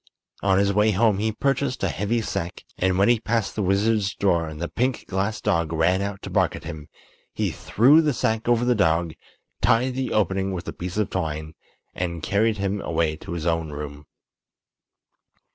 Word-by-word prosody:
On 95 Hz, -1 st, +3 dB
his 100 Hz, 0 st, +2 dB
way 105 Hz, +2 st, +3 dB
home 105 Hz, 0 st, +3 dB
he 110 Hz, +1 st, 0 dB
purchased 135 Hz, +2 st, -1 dB
a -, -, +3 dB
heavy 110 Hz, +4 st, -1 dB
sack, 85 Hz, -4 st, -4 dB, 0.2 s
and 95 Hz, 0 st, +2 dB
when 100 Hz, -, +4 dB
he 120 Hz, -1 st, +4 dB
passed 115 Hz, -3 st, -1 dB
the 110 Hz, -, -1 dB
wizard's 100 Hz, +1 st, +1 dB
door 85 Hz, -5 st, +1 dB
and 80 Hz, -1 st, -8 dB
the 85 Hz, -, -2 dB
pink 125 Hz, +5 st, -1 dB
glass 100 Hz, +3 st, -1 dB
dog 85 Hz, -1 st, 0 dB
ran 85 Hz, +4 st, +2 dB
out 100 Hz, -1 st, -4 dB
to -, -, -6 dB
bark -, -, +2 dB
at -, -, -9 dB
him 80 Hz, -3 st, -7 dB, 0.5 s
he -, -, 0 dB
threw 140 Hz, +9 st, +4 dB
the 155 Hz, -2 st, +1 dB
sack 110 Hz, -3 st, -1 dB
over 120 Hz, 0 st, +3 dB
the 125 Hz, -, +4 dB
dog, 85 Hz, -6 st, +1 dB, 0.5 s
tied 125 Hz, +3 st, +3 dB
the 130 Hz, 0 st, -2 dB
opening 95 Hz, -1 st, 0 dB
with 90 Hz, -2 st, -5 dB
a -, -, -4 dB
piece 90 Hz, +2 st, -6 dB
of 105 Hz, -3 st, 0 dB
twine, 80 Hz, -3 st, -3 dB, 0.4 s
and 85 Hz, -2 st, -4 dB
carried 110 Hz, +2 st, +1 dB
him 100 Hz, 0 st, -2 dB
away 80 Hz, -2 st, 0 dB
to 85 Hz, -, -8 dB
his 85 Hz, -2 st, -4 dB
own 80 Hz, -2 st, 0 dB
room. 75 Hz, 0 st, -7 dB
100 Hz, 195 wpm, -24 LUFS, 85-110 Hz, 0.5 s, when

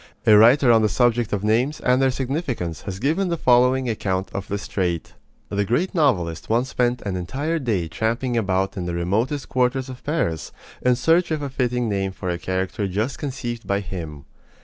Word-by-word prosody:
A 110 Hz, -, +7 dB
writer 120 Hz, +4 st, +6 dB
on 115 Hz, -1 st, +5 dB
the 110 Hz, -, +2 dB
subject 120 Hz, 0 st, +1 dB
of 105 Hz, -1 st, -1 dB
names 120 Hz, +8 st, +1 dB
and 125 Hz, +1 st, +2 dB
their 135 Hz, -, +4 dB
significance 130 Hz, -, -3 dB
has 95 Hz, -, -5 dB
given 160 Hz, -, 0 dB
the 170 Hz, -, -1 dB
following 125 Hz, 0 st, +3 dB
account 95 Hz, -4 st, -2 dB
of 100 Hz, -, -4 dB
this 100 Hz, 0 st, -4 dB
trait: 90 Hz, -4 st, -2 dB, 0.4 s
The 100 Hz, 0 st, 0 dB
great 125 Hz, -, 0 dB
novelist 95 Hz, -, +1 dB
once 120 Hz, +4 st, +1 dB
spent 125 Hz, -1 st, 0 dB
an 100 Hz, -3 st, -3 dB
entire 140 Hz, -, -2 dB
day 105 Hz, -, -1 dB
tramping 115 Hz, +8 st, -1 dB
about 95 Hz, -2 st, 0 dB
in 90 Hz, -3 st, -4 dB
the 85 Hz, -, -2 dB
remotest 110 Hz, -, -1 dB
quarters 130 Hz, +1 st, 0 dB
of 130 Hz, -1 st, -9 dB
Paris 85 Hz, -, -2 dB, 0.3 s
in 125 Hz, -1 st, +3 dB
search 165 Hz, +8 st, +2 dB
of 155 Hz, -2 st, -2 dB
a 140 Hz, -, -4 dB
fitting 125 Hz, -2 st, 0 dB
name 95 Hz, -2 st, -1 dB
for 95 Hz, -, -5 dB
a 85 Hz, -, -3 dB
character 95 Hz, +3 st, -2 dB
just 105 Hz, +8 st, -2 dB
conceived 120 Hz, -4 st, -5 dB
by 100 Hz, 0 st, +1 dB
him. 80 Hz, -7 st, -7 dB
115 Hz, 195 wpm, -22 LUFS, 95-130 Hz, 0.4 s, A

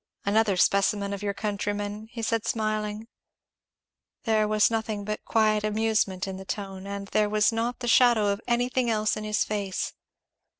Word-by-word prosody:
"Another 205 Hz, -1 st, +2 dB
specimen 200 Hz, +2 st, +2 dB
of 200 Hz, -, -5 dB
your 200 Hz, -1 st, -2 dB
countrymen," 205 Hz, +1 st, -3 dB
he 230 Hz, -1 st, -7 dB
said 225 Hz, 0 st, 0 dB
smiling. 215 Hz, 0 st, -2 dB, 1.2 s
There 215 Hz, -2 st, +2 dB
was 215 Hz, +1 st, +3 dB
nothing 220 Hz, -2 st, -2 dB
but 210 Hz, 0 st, -4 dB
quiet 215 Hz, -1 st, +2 dB
amusement 215 Hz, -3 st, 0 dB
in 190 Hz, -1 st, -5 dB
the 190 Hz, -, -8 dB
tone, 195 Hz, -1 st, -6 dB
and 200 Hz, 0 st, -5 dB
there 210 Hz, -1 st, +2 dB
was 210 Hz, +1 st, +3 dB
not 230 Hz, +2 st, -2 dB
the 240 Hz, -, -3 dB
shadow 235 Hz, -3 st, +5 dB
of 200 Hz, 0 st, -1 dB
anything 245 Hz, +1 st, +1 dB
else 215 Hz, -1 st, +1 dB
in 215 Hz, -, -5 dB
his 210 Hz, 0 st, +1 dB
face. 200 Hz, -3 st, -3 dB
215 Hz, 165 wpm, -26 LUFS, 200-220 Hz, 1.2 s, shadow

